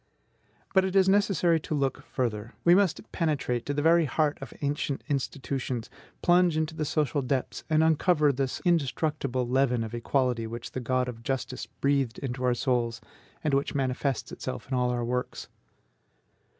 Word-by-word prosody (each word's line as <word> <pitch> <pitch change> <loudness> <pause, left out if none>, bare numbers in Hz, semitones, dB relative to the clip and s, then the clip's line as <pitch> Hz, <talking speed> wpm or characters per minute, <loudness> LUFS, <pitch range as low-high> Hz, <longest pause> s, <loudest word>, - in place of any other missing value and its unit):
But 190 -1 +5
it 190 0 -2
is 190 -1 +5
necessary 190 -4 +3
to 155 - -3
look 135 -2 -1
further. 115 -4 -3
We 170 - +6
must 195 +1 +2
penetrate 145 -8 -1
to 145 - 0
the 145 - 0
very 165 0 +5
heart 150 +1 0
of 135 - -7
ancient 140 -1 -1
institutions, 130 -3 -3 0.3
plunge 175 -2 +4
into 160 +1 -1
the 155 -1 -2
social 145 -2 0
depths, 130 0 -2
and 155 0 +4
uncover 160 -2 +3
this 135 0 -2
indestructible 145 -5 0
leaven 125 -2 +2
of 110 - -6
equality 120 -1 0
which 115 +1 -7
the - - -4
God 125 +1 0
of 115 -2 -7
justice 130 +1 -3
breathed 140 -4 0
into 130 -1 -4
our 125 -1 +3
souls, 120 -2 0 0.4
and 150 -3 0
which 140 +1 0
manifests 135 -1 -1
itself 65 - -6
in - - -5
all 125 -1 +2
our 120 -1 -1
works. 125 +1 -3
135 Hz, 165 wpm, -28 LUFS, 125-155 Hz, 0.4 s, We